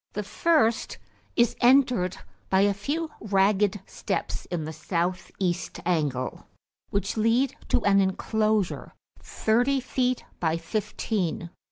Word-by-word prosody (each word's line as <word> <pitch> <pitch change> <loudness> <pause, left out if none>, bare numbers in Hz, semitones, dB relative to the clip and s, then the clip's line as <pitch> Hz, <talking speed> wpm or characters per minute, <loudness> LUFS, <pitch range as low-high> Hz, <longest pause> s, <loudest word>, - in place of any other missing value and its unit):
The 210 - -3
first 235 - +1 0.4
is 235 -1 +3
entered 245 -8 +4 0.3
by 190 0 +4
a 200 0 +4
few 295 +11 -3
ragged 200 0 +2
steps - - -3
in 170 -3 -3
the 160 - -5
south 175 +4 -2
east 180 -2 -2
angle, 145 -7 -1 0.4
which 200 +2 -2
lead 230 +4 +2
to - - +1
an 200 -1 +5
enclosure 215 +1 0 0.2
thirty 245 +5 +1
feet 255 -1 -1
by 160 -1 +1
fifteen. 175 -1 -2
205 Hz, 120 wpm, -26 LUFS, 180-235 Hz, 0.4 s, an